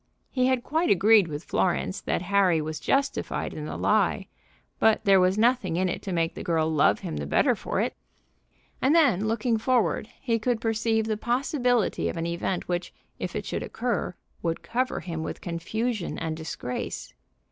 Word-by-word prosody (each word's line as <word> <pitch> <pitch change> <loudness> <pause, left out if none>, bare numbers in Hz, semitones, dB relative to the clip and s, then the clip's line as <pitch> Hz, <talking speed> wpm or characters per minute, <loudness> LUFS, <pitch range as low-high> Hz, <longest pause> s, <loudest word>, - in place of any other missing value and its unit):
He 255 -1 +2
had 260 -2 +1
quite 320 +6 0
agreed 205 0 +5
with 150 0 -5
Florence 185 +1 0
that - - -1
Harry 190 -3 +3
was 155 0 -4
justified 275 - -1
in - - -6
the - - -5
lie; - - +2 0.5
but 220 0 +3
there 195 -1 +6
was 185 +2 +3
nothing 230 -6 +2
in 185 +2 +1
it 175 - -3
to 195 - -5
make 165 -2 0
the - - -7
girl 160 -2 +1
love 145 -9 +3
him 75 - -4
the 75 -1 -4
better - - +3
for - - -3
it. - - 0 0.9
And 275 +5 +4
then, 245 - +4
looking 225 +1 +1
forward, 240 -2 +1
he 230 -3 0
could 235 +1 0
perceive 225 0 +1
the 215 -1 -1
possibility 245 -1 +1
of - - -5
an 165 - -2
event 170 +2 -2
which, 175 0 -2 0.3
if - - -4
it - - -3
should - - -3
occur, 235 -7 -2 0.3
would 165 -1 -2
cover 255 +3 -1
him 165 -3 -5
with - - -5
confusion 190 +5 -3
and 160 -1 -3
disgrace. 125 - -5
205 Hz, 180 wpm, -26 LUFS, 170-240 Hz, 0.9 s, there